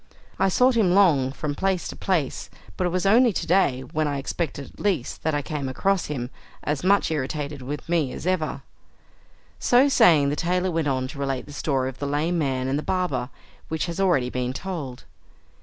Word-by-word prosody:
I 195 - +3
sought 250 +7 +4
him 190 -6 +3
long 150 -10 +4
from 145 +1 -3
place 190 +3 -1
to - - -6
place, 170 -8 -1 0.3
but 180 - 0
it - - 0
was 180 +1 -1
only 235 +4 +5
to - - -2
day, 155 -8 +2
when 150 +4 -2
I 145 -1 -1
expected 140 0 -4
it - - -20
least, 185 -12 -1
that 160 -1 0
I 145 - -1
came 140 -3 -3
across 195 +7 0
him, 125 -4 -4 0.3
as 150 0 -2
much 200 -2 +3
irritated 145 -1 -3
with 145 +3 -6
me 165 -6 +1
as - - -7
ever" 155 -7 -1 1.0
So 255 +3 +4
saying 155 - +5
the 145 - -1
tailor 180 +3 0
went 165 -2 0
on 130 -2 0
to 140 - -9
relate 135 -2 -2
the 145 - -11
story 135 -3 0
of 130 -1 -7
the 145 - -2
lame 155 +5 0
man 130 -3 -1
and 135 +2 0
the - - -3
barber, 150 -9 -1 0.4
which 160 0 -2
has 170 +1 -5
already 155 -10 +2
been 125 0 -2
told. 150 -7 -6
150 Hz, 205 wpm, -24 LUFS, 135-180 Hz, 1.0 s, only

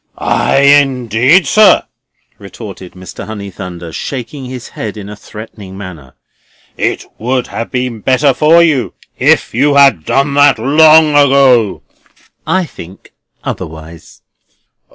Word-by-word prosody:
"Ay, 135 - 0
indeed, 135 - +3
sir!" 215 -1 +4 0.6
retorted 100 -2 -11
Mr. 90 0 -10
Honeythunder, 95 -5 -8
shaking 135 +1 -6
his 125 -1 -9
head 110 -1 -7
in 100 -1 -9
a 105 - -8
threatening 105 -2 -11
manner. 85 -10 -11 0.6
"It - - -2
would 125 +2 -2
have 115 - -6
been 125 -3 -3
better 130 +4 +1
for 160 +5 +4
you 145 -7 0 0.2
if - - +2
you 140 +5 +1
had 135 - +4
done 140 - 0
that 145 -2 +4
long 155 +5 +5
ago!" 135 -6 +3 0.6
"I 185 -1 0
think 95 - -14 0.3
otherwise." 80 +1 -9
125 Hz, 120 wpm, -12 LUFS, 100-140 Hz, 0.6 s, long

